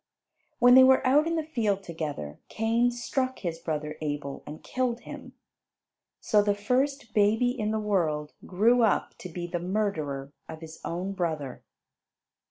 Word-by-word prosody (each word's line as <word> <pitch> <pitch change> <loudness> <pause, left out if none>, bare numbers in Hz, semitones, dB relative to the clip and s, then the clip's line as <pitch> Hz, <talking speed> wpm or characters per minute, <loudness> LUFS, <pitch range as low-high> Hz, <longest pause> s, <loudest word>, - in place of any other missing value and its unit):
When 245 0 +6
they 260 +1 +9
were 260 0 +5
out 290 +5 +4
in 335 - 0
the 320 - 0
field 215 -10 -1
together 150 - -5
Cain 230 +2 +1
struck 255 +2 -2
his 165 -3 -4
brother 155 -2 -4
Abel 145 -2 -4
and 150 +1 -9
killed 250 -2 -2
him. - - -10 0.9
So 210 -2 +3
the 205 0 +1
first 250 +3 -1
baby 220 +4 +3
in 220 -4 -2
the 220 - 0
world 160 -8 -1
grew 225 +7 +3
up 220 -3 +2
to 180 - -7
be 175 +1 -5
the 175 0 -3
murderer 160 -8 -2 0.2
of 160 0 -8
his 160 0 -10
own 180 +3 -3
brother. 160 -8 -3
205 Hz, 160 wpm, -27 LUFS, 160-245 Hz, 0.9 s, they